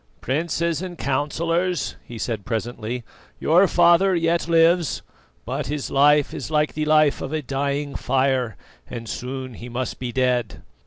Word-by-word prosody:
"Princes 165 +3 -1
and 180 -2 -6
Councillors," 165 +5 -1
he 120 - -9
said 110 -2 -3
presently, 120 +1 -4 0.4
"your 180 +5 +4
father 180 +3 +4
yet 170 0 +1
lives, 165 0 +3 0.4
but - - -3
his 145 +1 -3
life 145 +1 +4
is 140 - -5
like 150 -1 +1
the 155 0 -2
life 155 -1 +3
of 135 - -4
a 155 -1 -2
dying 140 +2 -2
fire 130 -4 0 0.3
and 115 -2 -6
soon 130 +2 -5
he 120 +2 -9
must 125 +2 -4
be 125 -1 -4
dead. 125 -3 0
140 Hz, 150 wpm, -23 LUFS, 125-165 Hz, 0.4 s, your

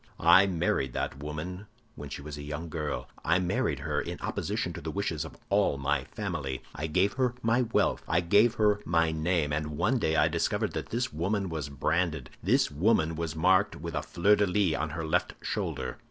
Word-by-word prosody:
I 85 +4 +7
married 80 -7 0
that 70 - -3
woman 85 +7 -5 0.3
when 75 -1 -8
she 70 - -7
was 75 0 -6
a 75 - -7
young 75 +3 -5
girl; 75 -2 -3 0.2
I 85 +3 +3
married 90 -1 0
her - - -1
in - - -6
opposition - - -2
to - - -7
the - - -5
wishes - - -2
of - - -10
all 70 - +3
my 70 -1 0
family; 65 -2 -4
I 75 - -3
gave 95 +6 +2
her 125 -2 0
my 115 +2 +3
wealth, 115 -2 +1
I 85 - +2
gave 105 +7 +4
her 105 -1 +3
my 80 -3 +2
name; 80 -1 0
and 75 0 -2
one 125 - +2
day 80 -6 +1
I - - +4
discovered - - 0
that - - -4
this 120 -4 -2
woman 95 +4 -1
was 80 -3 -4
branded—this 75 -1 0
woman 80 0 +2
was 80 -1 -3
marked 95 +5 +3
with 85 +2 -6
a - - -1
fleur 100 +5 +3
de 105 - +2
lis 90 -2 +2
on 80 +1 -2
her 80 +1 -4
left 80 - 0
shoulder." - - -3
80 Hz, 200 wpm, -29 LUFS, 75-100 Hz, 0.3 s, I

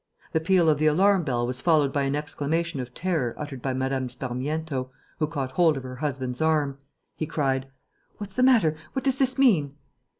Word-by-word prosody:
The 160 - +3
peal 170 +1 +3
of 150 -2 +3
the 155 - +3
alarm 190 +5 +4
bell 120 -5 0
was 125 +1 -4
followed 150 -5 +3
by 145 - +1
an 135 +1 0
exclamation 150 +1 -2
of 125 -1 -5
terror 160 -6 -1
uttered 145 -4 -6
by 135 - -1
Mme. 130 0 -1
Sparmiento, 130 +2 -3 0.3
who 155 - +1
caught 140 -4 -3
hold 160 0 +3
of 135 - -6
her 130 0 -7
husband's 130 -3 -3
arm. 150 -3 +1 0.4
He 155 - -3
cried: 135 -4 -1 0.5
"What's 205 -2 -7
the 250 - 0
matter? 230 -12 +5 0.2
What 265 - -2
does 270 -1 +2
this 260 -1 +1
mean?" 170 - +3
150 Hz, 195 wpm, -26 LUFS, 130-165 Hz, 0.5 s, matter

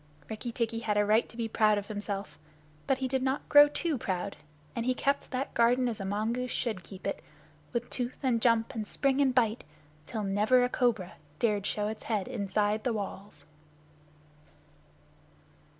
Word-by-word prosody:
Rikki 225 +2 -4
tikki 230 -1 -1
had 215 -2 -1
a 205 - +4
right 215 +3 +3
to 230 - -14
be 230 -1 -1
proud 215 -1 +3
of 200 - -3
himself. 200 -6 -5 0.5
But 270 - +3
he 260 0 -1
did 260 0 0
not 265 +1 -1
grow 290 0 +9
too 295 -1 -1
proud, 190 0 -2 0.4
and 235 - -1
he 255 - +2
kept 280 +1 0
that 260 +1 -3
garden 245 +2 +3
as 230 -3 -3
a 195 - -4
mongoose 225 +5 -1
should 230 -6 -2
keep 185 +3 -11
it, - - -3 0.5
with 240 -1 -2
tooth 245 -1 -3
and 240 -4 +2
jump 230 +1 +3
and 220 -3 -4
spring 275 +4 +1
and 265 -2 +2
bite, 230 -2 +2 0.4
till 220 -3 -3
never 210 +6 +3
a 245 - +1
cobra 225 -8 0 0.2
dared 210 -2 +1
show 210 0 -1
its 215 0 -6
head 215 -3 -1
inside 210 -2 0
the 245 - 0
walls. 200 -7 -6
225 Hz, 180 wpm, -30 LUFS, 205-250 Hz, 0.5 s, grow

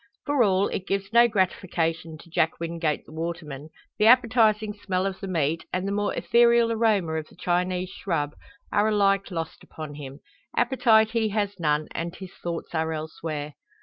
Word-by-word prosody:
For 290 -3 +2
all, 195 -2 +3
it 190 - -4
gives 195 +2 -2
no 235 0 +7
gratification 170 -5 -1
to 170 - -16
Jack 160 0 +1
Wingate 165 -2 -2
the - - -15
waterman. 160 -3 -5 0.3
The 210 - +5
appetising 225 -3 +4
smell 185 -1 0
of 195 -1 -3
the 195 - -6
meat, 165 -3 -1
and 185 +2 -1
the - - -1
more 205 0 0
ethereal 235 -1 +4
aroma 215 -7 +2
of 155 - -8
the - - -19
Chinese 180 +1 -1
shrub, 150 -6 -2 0.4
are 205 +1 +3
alike 200 -2 +2
lost 165 -3 -5
upon 155 -2 -8
him. 140 -1 -9 0.4
Appetite 235 -3 +4
he 225 -2 +1
has 205 -2 -2
none, 150 -1 +1
and 170 +1 -4
his 190 -2 -10
thoughts 170 -1 -6
are 160 0 0
elsewhere. 155 -1 -5
185 Hz, 175 wpm, -25 LUFS, 160-215 Hz, 0.4 s, no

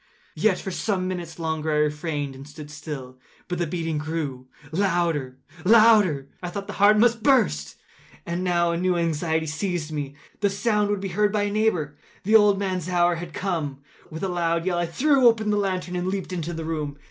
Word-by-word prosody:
Yet, 210 -4 +2
for 190 - -5
some 185 -1 -1
minutes 175 -3 -5
longer 160 -1 -2
I - - +1
refrained 150 -1 -1
and 135 +2 -11
stood 150 0 -10
still. 135 -4 -8 0.3
But 180 -1 -3
the 175 - 0
beating 165 -2 -2
grew 150 -5 -4 0.2
louder, 165 -7 0 0.3
louder! 210 -9 +5
I 175 - -4
thought 200 +3 -5
the - - -7
heart 210 +1 +7
must 230 +1 +3
burst. 75 - +2 0.5
And 170 +2 -3
now 175 -2 +2
a 170 - -1
new 180 0 +1
anxiety 160 -1 0
seized 160 0 -3
me—the 150 +7 -4
sound 210 +1 +1
would 205 -2 -1
be 195 - -3
heard 205 +3 +1
by 210 -1 +1
a 205 - -1
neighbour! 180 -9 0 0.3
The 215 +3 +3
old 210 -2 +6
man’s 185 -3 -2
hour 175 -1 +2
had 170 0 -7
come! 155 -7 -3 0.3
With 160 +3 -7
a - - +1
loud 170 -2 0
yell, 180 -2 0
I 175 - 0
threw 265 - +4
open 220 -2 +3
the 205 - +2
lantern 185 -3 -2
and 180 0 -2
leaped 190 -1 -3
into 170 -1 -3
the 160 -1 -5
room. 150 -3 -3
175 Hz, 195 wpm, -24 LUFS, 155-200 Hz, 0.5 s, heart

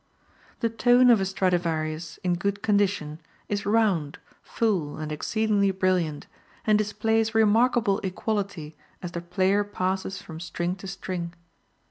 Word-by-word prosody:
The 230 - +2
tone 245 +2 +5
of 220 -4 +5
a - - +1
Stradivarius, 170 -4 -1
in 180 -1 +1
good 200 +3 -2
condition, 200 -7 0 0.3
is 205 -1 -2
round, 200 -9 +1 0.2
full 190 -10 -1
and 155 0 -5
exceedingly 205 +5 +1
brilliant, 185 -5 0 0.4
and 215 - +4
displays 220 +2 +1
remarkable 225 -1 +3
equality 190 -5 -3 0.3
as 175 - -4
the 170 - -4
player 185 +4 +1
passes 190 -1 -2
from 160 -1 -9
string 175 +2 -3
to 195 - -9
string. 185 -3 -5
190 Hz, 130 wpm, -26 LUFS, 170-210 Hz, 0.4 s, tone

